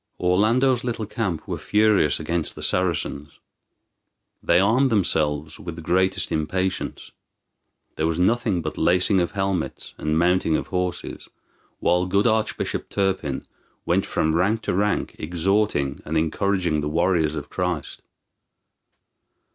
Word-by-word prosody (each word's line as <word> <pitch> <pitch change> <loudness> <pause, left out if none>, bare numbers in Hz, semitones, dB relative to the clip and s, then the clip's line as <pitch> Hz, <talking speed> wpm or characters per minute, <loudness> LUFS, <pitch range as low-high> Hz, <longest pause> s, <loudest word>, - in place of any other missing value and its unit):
Orlando's 115 +8 +2
little 120 -3 -2
camp 100 -7 -3
were - - -3
furious 105 -8 +3
against 85 0 -2
the - - -8
Saracens. 80 -5 -1 1.0
They - - +3
armed 120 +8 +3
themselves 80 - 0
with 85 -2 -7
the 85 - -9
greatest 95 +3 +1
impatience. 95 +5 -2 0.9
There 80 - +1
was 80 -1 -1
nothing 95 -1 +1
but 80 - -4
lacing 90 +2 +3
of 85 - -1
helmets 95 -4 -2
and 75 0 0
mounting 85 -1 +2
of - - -1
horses, 90 -1 -3 0.5
while 90 +1 +2
good 100 +2 +2
Archbishop 110 -1 0
Turpin 95 -8 -1 0.4
went - - +1
from 80 0 0
rank 105 +6 +1
to - - -1
rank 100 +3 0
exhorting 85 -4 0
and 80 +2 -2
encouraging 85 0 0
the 75 - -2
warriors 85 -1 +1
of 75 -1 -6
Christ. 90 -3 -3
90 Hz, 130 wpm, -23 LUFS, 80-100 Hz, 1.0 s, furious